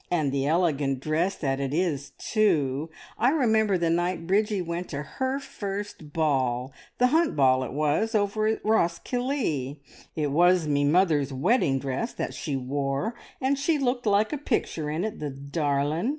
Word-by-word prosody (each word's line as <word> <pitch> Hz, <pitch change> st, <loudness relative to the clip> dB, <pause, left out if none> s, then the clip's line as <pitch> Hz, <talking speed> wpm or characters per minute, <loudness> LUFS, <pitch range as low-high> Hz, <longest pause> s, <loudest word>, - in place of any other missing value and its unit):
And 155 Hz, -6 st, +1 dB
the 135 Hz, 0 st, 0 dB
elegant 150 Hz, -5 st, +1 dB
dress 160 Hz, +7 st, 0 dB
that 135 Hz, -3 st, -1 dB
it 140 Hz, +1 st, -2 dB
is, 155 Hz, -6 st, -1 dB
too! 160 Hz, -, +1 dB, 0.3 s
I 240 Hz, +3 st, +4 dB
remember 220 Hz, -9 st, +2 dB
the 170 Hz, -1 st, +1 dB
night 175 Hz, 0 st, 0 dB
Bridgie 205 Hz, +3 st, +1 dB
went 170 Hz, +1 st, -4 dB
to 145 Hz, -1 st, -4 dB
her 260 Hz, -, -2 dB
first 200 Hz, -, -6 dB
ball, 130 Hz, -5 st, 0 dB, 0.2 s
the 250 Hz, -, +4 dB
Hunt 320 Hz, +5 st, +2 dB
Ball 130 Hz, -2 st, +4 dB
it 125 Hz, -, -5 dB
was, 155 Hz, -, 0 dB
over 215 Hz, +1 st, +1 dB
at 220 Hz, -1 st, -1 dB
Roskillie. 175 Hz, -, 0 dB, 0.4 s
It 150 Hz, -3 st, -1 dB
was 175 Hz, +2 st, +4 dB
me 145 Hz, -1 st, +2 dB
mother's 150 Hz, -3 st, +3 dB
wedding 135 Hz, -, +2 dB
dress 135 Hz, -, -3 dB
that -, -, -3 dB
she 145 Hz, -4 st, -3 dB
wore, 135 Hz, -, -2 dB, 0.3 s
and 270 Hz, +1 st, +1 dB
she 305 Hz, +3 st, +2 dB
looked 250 Hz, -3 st, -1 dB
like 210 Hz, +5 st, +3 dB
a 295 Hz, -, -2 dB
picture 170 Hz, -, -1 dB
in 155 Hz, +4 st, -2 dB
it, 220 Hz, -, -5 dB
the 150 Hz, -, -3 dB
darlin'! 145 Hz, -, -1 dB
165 Hz, 165 wpm, -26 LUFS, 140-215 Hz, 0.4 s, I